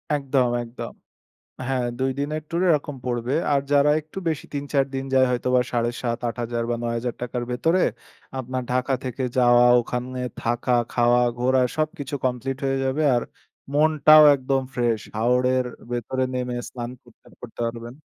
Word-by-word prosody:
একদম, 135 Hz, -3 st, +1 dB
একদম। 115 Hz, +1 st, -8 dB, 0.7 s
হ্যাঁ, 130 Hz, -2 st, 0 dB
২ 130 Hz, 0 st, +1 dB
দিনের 150 Hz, +2 st, -2 dB
ট্যুরে 175 Hz, +2 st, 0 dB
এরকম 145 Hz, -1 st, -1 dB
পড়বে। 120 Hz, +1 st, -1 dB, 0.2 s
আর 140 Hz, -, +3 dB
যারা 145 Hz, +1 st, +5 dB
একটু 155 Hz, +4 st, -15 dB
বেশি 155 Hz, -, -3 dB
৩-৪ 140 Hz, -1 st, 0 dB
দিন 135 Hz, -, -2 dB
যায় 130 Hz, 0 st, +5 dB
হয়তো 125 Hz, 0 st, -1 dB
বা 125 Hz, -, +5 dB
৭,৫০০ 120 Hz, 0 st, -1 dB
৮০০০ 120 Hz, 0 st, -3 dB
বা 120 Hz, -, +1 dB
৳৯,০০০ 120 Hz, +1 st, -3 dB
র -, -, -3 dB
ভেতরে 165 Hz, +9 st, +2 dB, 0.6 s
আপনার 130 Hz, 0 st, -3 dB
ঢাকা 130 Hz, +1 st, 0 dB
থেকে 130 Hz, +1 st, -4 dB
যাওয়া 120 Hz, -1 st, +6 dB, 0.2 s
ওখানে, 125 Hz, +2 st, -4 dB, 0.2 s
থাকা, 120 Hz, +1 st, +1 dB, 0.2 s
খাওয়া, 120 Hz, 0 st, +3 dB, 0.2 s
ঘোরা 130 Hz, +1 st, +3 dB, 0.2 s
সবকিছু 155 Hz, -2 st, -2 dB
কমপ্লিট 130 Hz, +1 st, -2 dB
হয়ে 135 Hz, 0 st, +1 dB
যাবে। 135 Hz, +4 st, 0 dB
আর 120 Hz, -, +1 dB, 0.5 s
মনটাও 155 Hz, 0 st, +6 dB
একদম 135 Hz, 0 st, 0 dB
ফ্রেশ। 120 Hz, -3 st, +1 dB, 0.2 s
হাওরের 125 Hz, +2 st, +2 dB, 0.3 s
ভেতরে 130 Hz, +2 st, -1 dB
নেমে 125 Hz, -1 st, -2 dB
স্নান 120 Hz, -1 st, -6 dB
করতে, -, -, -23 dB
করতে -, -, -11 dB
পারবেন। 115 Hz, +1 st, -5 dB
125 Hz, 155 wpm, -23 LUFS, 120-140 Hz, 0.7 s, যাওয়া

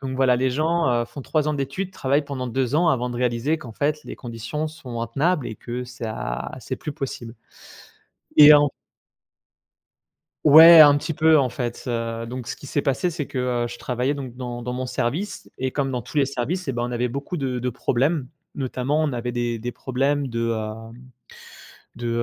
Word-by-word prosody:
Donc 130 Hz, -1 st, -4 dB
voilà 130 Hz, -2 st, +3 dB
les 130 Hz, +1 st, +1 dB
gens, 160 Hz, +3 st, +1 dB
heu, -, -, -3 dB
font 135 Hz, +3 st, -9 dB
3 155 Hz, +2 st, 0 dB
ans 150 Hz, -, 0 dB
d'études, 145 Hz, +7 st, -3 dB
travaillent 140 Hz, -2 st, 0 dB
pendant 135 Hz, -3 st, -4 dB
2 130 Hz, +1 st, -1 dB
ans 170 Hz, +1 st, +3 dB
avant 125 Hz, -4 st, +1 dB
de 120 Hz, -, -5 dB
réaliser 125 Hz, +5 st, 0 dB
qu'en 120 Hz, -6 st, -10 dB
fait 150 Hz, +5 st, -1 dB
les -, -, -7 dB
conditions 120 Hz, +6 st, -5 dB
sont 125 Hz, -7 st, -7 dB
intenables 140 Hz, +6 st, 0 dB
et 110 Hz, -, -7 dB
que 120 Hz, +1 st, -5 dB
ça 115 Hz, -, -5 dB
c'est -, -, -5 dB
plus 150 Hz, -, -6 dB
possible 130 Hz, -6 st, -6 dB, 1.0 s
et 150 Hz, 0 st, +11 dB
en 145 Hz, 0 st, +5 dB, 1.8 s
Ouais, 160 Hz, +2 st, +10 dB
un 145 Hz, -2 st, +9 dB
petit 155 Hz, +2 st, -3 dB
peu, 160 Hz, +1 st, +5 dB
en 135 Hz, -4 st, +3 dB
fait, 120 Hz, -1 st, -4 dB
heu, 115 Hz, -1 st, -3 dB
donc 125 Hz, 0 st, -6 dB
ce -, -, -4 dB
qui -, -, -13 dB
s'est 145 Hz, -, 0 dB
passé 140 Hz, +6 st, 0 dB
c'est 155 Hz, -4 st, -4 dB
que, 130 Hz, -, -5 dB, 0.3 s
heu, -, -, -1 dB
je 120 Hz, -, -8 dB
travaillais 125 Hz, +3 st, -1 dB
donc 130 Hz, -4 st, -7 dB
dans 120 Hz, -1 st, -6 dB
dans 125 Hz, +1 st, -4 dB
mon 130 Hz, +1 st, -3 dB
service 150 Hz, +11 st, -3 dB
et 130 Hz, 0 st, -2 dB
comme 140 Hz, -2 st, -1 dB
dans 125 Hz, -1 st, -2 dB
tous 120 Hz, -, -11 dB
les 140 Hz, -2 st, +4 dB
services 140 Hz, +7 st, -3 dB
et -, -, 0 dB
ben, 120 Hz, 0 st, -2 dB
on 125 Hz, -, -4 dB
avait 120 Hz, +1 st, 0 dB
beaucoup 140 Hz, +8 st, -5 dB
de 130 Hz, -5 st, -2 dB
de 125 Hz, +1 st, -2 dB
problèmes. 135 Hz, +3 st, 0 dB, 0.3 s
Notamment 135 Hz, +3 st, -1 dB
on 150 Hz, -3 st, 0 dB
avait 120 Hz, 0 st, -3 dB
des 120 Hz, -1 st, -2 dB
des 120 Hz, +2 st, -5 dB
problèmes 135 Hz, +3 st, -1 dB
de, 115 Hz, -1 st, -4 dB
heu 110 Hz, -2 st, -1 dB, 1.2 s
de, 120 Hz, 0 st, -4 dB
130 Hz, 200 wpm, -23 LUFS, 120-145 Hz, 1.8 s, et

